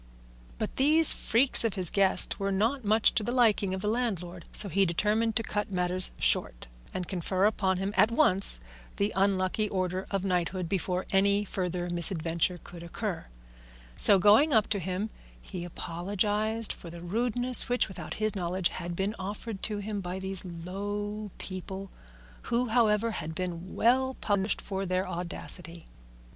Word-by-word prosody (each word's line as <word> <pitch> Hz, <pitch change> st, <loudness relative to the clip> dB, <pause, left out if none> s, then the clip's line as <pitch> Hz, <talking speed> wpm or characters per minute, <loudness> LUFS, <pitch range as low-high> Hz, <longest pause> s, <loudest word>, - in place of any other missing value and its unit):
But 215 Hz, -, -5 dB
these 310 Hz, +4 st, +8 dB
freaks 250 Hz, +3 st, +4 dB
of 225 Hz, -3 st, -1 dB
his 185 Hz, -4 st, +3 dB
guest 195 Hz, -1 st, +5 dB
were 195 Hz, 0 st, -2 dB
not 230 Hz, +7 st, -1 dB
much 215 Hz, +1 st, +2 dB
to -, -, +1 dB
the 235 Hz, -, -3 dB
liking 220 Hz, -6 st, +2 dB
of 190 Hz, -, -6 dB
the -, -, -2 dB
landlord, 185 Hz, -7 st, -3 dB
so 205 Hz, -, +2 dB
he 195 Hz, +2 st, +1 dB
determined 210 Hz, +6 st, 0 dB
to 225 Hz, -, +1 dB
cut 210 Hz, -1 st, -4 dB
matters 180 Hz, 0 st, +1 dB
short -, -, 0 dB, 0.3 s
and 180 Hz, -2 st, -5 dB
confer 185 Hz, +1 st, -1 dB
upon 195 Hz, -3 st, 0 dB
him 195 Hz, +2 st, -4 dB
at 220 Hz, -, +4 dB
once 195 Hz, -, +7 dB, 0.4 s
the 200 Hz, +1 st, -1 dB
unlucky 195 Hz, +2 st, 0 dB
order 185 Hz, 0 st, -3 dB
of 195 Hz, -1 st, -3 dB
knighthood 180 Hz, -1 st, -2 dB
before 185 Hz, 0 st, -2 dB
any 200 Hz, +1 st, +2 dB
further 180 Hz, -2 st, -4 dB
misadventure 170 Hz, 0 st, -1 dB
could 175 Hz, -1 st, -12 dB
occur; 175 Hz, +2 st, -6 dB, 0.7 s
so, 200 Hz, -, +6 dB
going 210 Hz, -, +4 dB
up 220 Hz, -2 st, +3 dB
to 205 Hz, -, 0 dB
him, 185 Hz, +4 st, -4 dB, 0.3 s
he 180 Hz, -3 st, -8 dB
apologised 205 Hz, +6 st, -2 dB
for 170 Hz, -, -12 dB
the 170 Hz, 0 st, -11 dB
rudeness 245 Hz, +7 st, +3 dB
which, 245 Hz, 0 st, +1 dB
without 175 Hz, -5 st, -8 dB
his 215 Hz, 0 st, -2 dB
knowledge, 180 Hz, -1 st, -1 dB
had 175 Hz, -1 st, -6 dB
been 195 Hz, +4 st, -2 dB
offered 200 Hz, +2 st, -7 dB
to 210 Hz, -1 st, -3 dB
him 205 Hz, 0 st, -5 dB
by 180 Hz, 0 st, -6 dB
these 190 Hz, -1 st, -3 dB
low 205 Hz, +4 st, -6 dB
people, 190 Hz, +1 st, -7 dB, 0.6 s
who, 240 Hz, +1 st, 0 dB
however, 225 Hz, -1 st, +1 dB
had 160 Hz, -5 st, -6 dB
been 180 Hz, +1 st, -6 dB
well 260 Hz, +3 st, +1 dB
punished 200 Hz, -1 st, -1 dB
for 195 Hz, -1 st, -5 dB
their 185 Hz, 0 st, -2 dB
audacity. 170 Hz, 0 st, -6 dB
195 Hz, 160 wpm, -28 LUFS, 180-215 Hz, 0.7 s, these